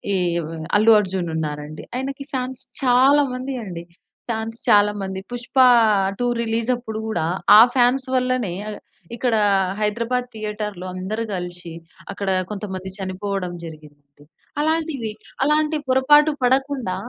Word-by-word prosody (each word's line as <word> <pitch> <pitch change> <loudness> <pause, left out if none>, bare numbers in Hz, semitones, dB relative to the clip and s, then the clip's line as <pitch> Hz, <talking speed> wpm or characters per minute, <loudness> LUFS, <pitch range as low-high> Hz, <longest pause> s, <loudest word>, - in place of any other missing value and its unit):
ఈవ్ 170 -3 -1 0.3
'అల్లు 220 +2 +5
అర్జున్' 185 -3 -3
ఉన్నారండి. 150 -1 -5
ఆయనకి 270 +2 -4
ఫాన్స్ 255 0 -3 0.2
చాలా 265 +3 +5
మంది 255 +2 -4
అండి. 175 -3 -7 0.5
ఫాన్స్ 225 0 -3
చాలా 210 -1 +5
మంది. 190 -1 -4
'పుష్ప 245 +2 -7 0.6
2' 245 - +1 0.2
రిలీజప్పుడు 230 0 -2
గూడా 220 -7 -1 0.3
ఆ - - +11
ఫాన్స్ 255 +1 +3
వల్లనే 255 -6 0 0.6
ఇక్కడ 240 0 0 0.3
ఆహ్, 190 -1 -1
హైదరాబాద్ 235 +4 -1
థియేటర్‌లో 210 -3 -5
అందరూ 200 +5 -3
గలిశి 175 -1 -6 0.4
అక్కడ 200 0 -4 0.2
కొంతమంది 190 -3 -5
చనిపోవడం 190 -1 -4
జరిగిందండి. 145 -3 -13 0.4
అలాంటివి 310 -7 -1 0.3
అలాంటి 305 +2 +2
పొరపాటు 295 +4 +5
పడకుండా 260 -5 +1
220 Hz, 115 wpm, -21 LUFS, 185-255 Hz, 0.6 s, ఆ